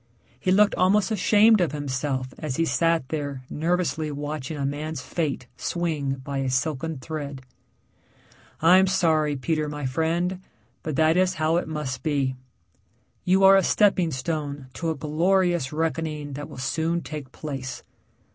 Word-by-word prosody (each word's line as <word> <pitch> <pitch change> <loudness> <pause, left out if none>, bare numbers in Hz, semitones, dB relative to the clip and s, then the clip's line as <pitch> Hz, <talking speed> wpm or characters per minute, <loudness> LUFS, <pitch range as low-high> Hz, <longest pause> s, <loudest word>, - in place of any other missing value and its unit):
He 185 - 0
looked 205 +2 +5
almost 195 +4 +3
ashamed 215 +1 +5
of 165 -4 0
himself 130 -2 -2
as 150 -4 -3
he 165 - +1
sat 165 -3 +1
there 140 -4 -4
nervously 165 -1 0
watching 145 0 -4
a 140 - -2
man's 150 +1 -3
fate 150 -6 -2
swing 160 -6 -1
by 140 0 -3
a 135 -1 -1
silken 150 +4 -1
thread. 145 -2 -6 1.2
"I'm 185 +3 +6
sorry, 155 -5 +2
Peter, 150 +3 -1
my 150 -1 -5
friend, 170 +7 -1 0.4
but 155 -3 -4
that 160 +3 +3
is 185 0 +2
how 160 0 +1
it 175 - -1
must 150 -5 -4
be. 140 -4 0 0.9
You 190 +2 +4
are 195 0 +9
a 195 - +6
stepping 190 -4 +3
stone 145 -1 -4
to 165 +3 -3
a 160 - -1
glorious 170 0 +1
reckoning 155 -2 -2
that 145 +2 -6
will - - -10
soon 160 +6 -1
take 150 -5 -7
place. 135 -5 -6
155 Hz, 150 wpm, -25 LUFS, 140-170 Hz, 1.2 s, are